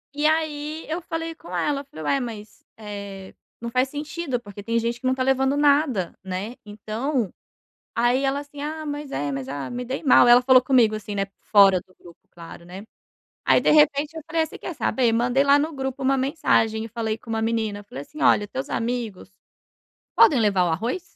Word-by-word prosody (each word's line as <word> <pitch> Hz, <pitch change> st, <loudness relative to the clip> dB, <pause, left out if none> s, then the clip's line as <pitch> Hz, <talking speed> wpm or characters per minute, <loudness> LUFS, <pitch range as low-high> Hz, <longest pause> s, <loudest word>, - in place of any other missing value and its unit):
E 300 Hz, +1 st, +2 dB
aí 310 Hz, 0 st, -1 dB
eu 330 Hz, +3 st, -3 dB
falei 330 Hz, 0 st, -4 dB
com 325 Hz, -, -10 dB
ela, 285 Hz, -1 st, -1 dB
falei: 155 Hz, -, -10 dB
"Ué 275 Hz, -, +2 dB
mas, 220 Hz, -4 st, -8 dB
eh, 200 Hz, -3 st, -8 dB, 0.3 s
não 235 Hz, 0 st, -6 dB
faz 255 Hz, +1 st, +1 dB
sentido, 295 Hz, -2 st, -4 dB
porque 205 Hz, -2 st, -11 dB
tem 230 Hz, +3 st, -1 dB
gente 235 Hz, +1 st, -1 dB
que 255 Hz, -, -1 dB
não 260 Hz, -, +2 dB
tá 260 Hz, -, -1 dB
levando 270 Hz, +1 st, +2 dB
nada." 285 Hz, -, +2 dB
Né, 190 Hz, +6 st, -5 dB
então, 215 Hz, +3 st, -3 dB, 0.6 s
aí 240 Hz, +3 st, +2 dB
ela 270 Hz, +1 st, +1 dB
assim: 290 Hz, 0 st, -11 dB
"Ah, 310 Hz, +1 st, -5 dB
mas 290 Hz, -1 st, -5 dB
é, 145 Hz, -, -2 dB
mas 135 Hz, -1 st, -5 dB
ah, 140 Hz, -1 st, -5 dB
me 245 Hz, 0 st, -5 dB
dei 265 Hz, +5 st, -5 dB
mal." 250 Hz, -2 st, +6 dB
Ela 240 Hz, +1 st, +8 dB
falou 255 Hz, 0 st, +5 dB
comigo, 245 Hz, -5 st, +3 dB
assim, 210 Hz, -1 st, -5 dB
né 195 Hz, 0 st, 0 dB
fora 195 Hz, -3 st, +5 dB
do 185 Hz, -, -24 dB
grupo, 170 Hz, 0 st, -15 dB
claro, 170 Hz, 0 st, -12 dB
né. 185 Hz, +4 st, -10 dB, 0.6 s
Aí, -, -, +4 dB
de -, -, +3 dB
repente, 300 Hz, +1 st, +3 dB
eu -, -, -6 dB
falei: 325 Hz, 0 st, +1 dB
"Você -, -, -11 dB
quer 345 Hz, -, -6 dB
saber?" 245 Hz, -5 st, +1 dB
Mandei 245 Hz, +4 st, +2 dB
lá 280 Hz, +1 st, +6 dB
no 310 Hz, +3 st, -1 dB
grupo 265 Hz, 0 st, -4 dB
uma 270 Hz, +1 st, +2 dB
mensagem 240 Hz, -5 st, +1 dB
e 225 Hz, -, -6 dB
falei 225 Hz, -1 st, -3 dB
com 230 Hz, -, -16 dB
uma 225 Hz, 0 st, -1 dB
menina, 220 Hz, -2 st, -1 dB
falei 140 Hz, -9 st, -8 dB
assim: 305 Hz, -, -11 dB
"Olha, 205 Hz, -, +4 dB
teus 135 Hz, -9 st, -6 dB
amigos, 230 Hz, -5 st, -3 dB, 0.8 s
podem 310 Hz, -, +6 dB
levar 200 Hz, -4 st, +3 dB
o -, -, 0 dB
arroz?" 230 Hz, -, -2 dB
245 Hz, 205 wpm, -23 LUFS, 210-285 Hz, 0.8 s, Ela